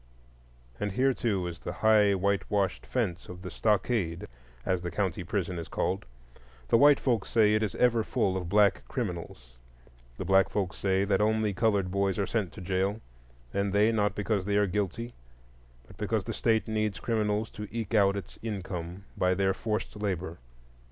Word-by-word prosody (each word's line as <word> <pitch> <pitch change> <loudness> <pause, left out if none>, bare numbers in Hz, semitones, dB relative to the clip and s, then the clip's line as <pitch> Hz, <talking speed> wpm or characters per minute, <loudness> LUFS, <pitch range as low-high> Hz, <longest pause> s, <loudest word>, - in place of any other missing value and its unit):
And 105 -1 -2
here, 130 +3 +3
too, 100 -7 -1
is 85 -1 -5
the - - -5
high 105 -2 +5
whitewashed 100 +1 0
fence 100 -9 -2
of 90 +1 -9
the 90 - -6
"stockade," 105 -5 0 0.4
as 95 -1 0
the 90 - -3
county 95 -2 -2
prison 90 -1 -2
is 85 - -6
called; 95 -3 -2 0.6
the - - +5
white 145 +1 +7
folks 120 -7 0
say 105 -2 +4
it 110 - +2
is 105 -4 -2
ever 120 -2 +3
full 110 -6 0
of 90 -3 -3
black 105 +1 +4
criminals,—the - - -8
black 95 0 +4
folks 95 -5 -2
say 95 0 +1
that 100 0 +2
only 110 -1 +2
colored 100 -2 +1
boys 100 -1 0
are 100 - +1
sent 105 -5 -1
to 105 - -9
jail, 95 +3 -1 0.5
and 100 0 0
they 105 +2 +4
not 105 -3 +1
because 105 -1 0
they 100 0 +1
are 105 - +4
guilty, 105 +5 -2 0.7
but - - -16
because - - -1
the - - -4
State 110 0 +1
needs 110 -2 -1
criminals 110 -1 -1
to 105 0 -7
eke 115 -1 -4
out 100 -2 +4
its 100 - -8
income 95 -3 -5
by 90 0 +2
their 95 0 +2
forced 105 +1 -3
labor. 95 -5 -3
100 Hz, 175 wpm, -29 LUFS, 90-110 Hz, 0.7 s, white